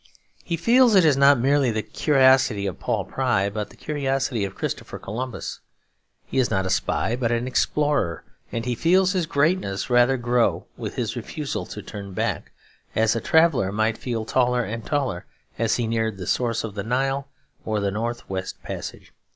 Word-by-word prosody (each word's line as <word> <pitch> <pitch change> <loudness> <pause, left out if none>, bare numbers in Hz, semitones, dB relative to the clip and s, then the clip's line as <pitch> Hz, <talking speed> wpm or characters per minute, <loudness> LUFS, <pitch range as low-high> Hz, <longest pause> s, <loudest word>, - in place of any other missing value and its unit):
He 170 - -2
feels 235 +5 +5
it 185 -3 +6
is 150 -3 +5
not 140 +1 +6
merely 135 +1 +3
the 110 -1 -1
curiosity 130 -7 +3
of 95 - -4
Paul - - -1
Pry, 100 +1 0
but 105 0 -4
the - - -16
curiosity 135 -6 -1
of 95 -1 -4
Christopher - - -4
Columbus. 125 +4 -5 0.7
He 135 - -1
is 125 - +2
not 95 0 0
a 95 - -1
spy 110 +4 0
but 120 -2 -1
an 120 +1 0
explorer; 140 - 0 0.3
and 115 0 -3
he 125 - 0
feels 180 +8 +3
his 180 -5 0
greatness 140 - 0
rather 120 +2 +4
grow 120 -1 +1
with - - -6
his - - -2
refusal - - -4
to - - -8
turn 100 -2 -8
back, - - -2 0.4
as 110 +1 +3
a 115 - -1
traveller 160 - +3
might 110 +2 +1
feel 115 -3 -3
taller 125 +1 +2
and 115 +1 -5
taller 140 - -1 0.3
as 115 -1 +2
he 120 - -1
neared 110 -2 -1
the 90 - -6
source 115 +1 0
of 110 -3 -5
the 100 - -4
Nile 135 +3 -1 0.4
or 110 -1 -1
the 100 -1 0
North 115 +3 -3
West 95 -1 -5
Passage. - - -7
120 Hz, 185 wpm, -24 LUFS, 110-140 Hz, 0.7 s, it